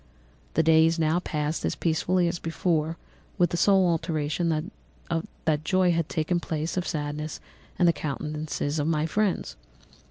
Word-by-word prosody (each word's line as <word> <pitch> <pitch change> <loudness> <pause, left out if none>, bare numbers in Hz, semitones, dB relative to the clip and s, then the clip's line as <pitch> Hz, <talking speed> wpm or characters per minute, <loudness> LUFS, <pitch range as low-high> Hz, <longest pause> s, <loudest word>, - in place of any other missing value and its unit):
"The 160 - +4
days 160 +1 +5
now 160 +1 +2
passed 150 -3 -2
as - - 0
peaceably 175 +2 +1
as 170 0 -2
before, 165 -1 -1 0.4
with 175 -3 +3
the - - 0
sole 190 +1 +4
alteration 165 0 0 1.0
that 155 -2 +1
joy 185 +1 +3
had 165 -2 0
taken 165 +2 0
place 160 -1 -3
of 185 -1 -1
sadness 150 0 -3 0.4
in 180 - +3
the 170 - +5
countenances 150 0 -3
of 145 - 0
my 155 -1 +1
friends. 185 - 0
160 Hz, 150 wpm, -26 LUFS, 155-175 Hz, 1.0 s, days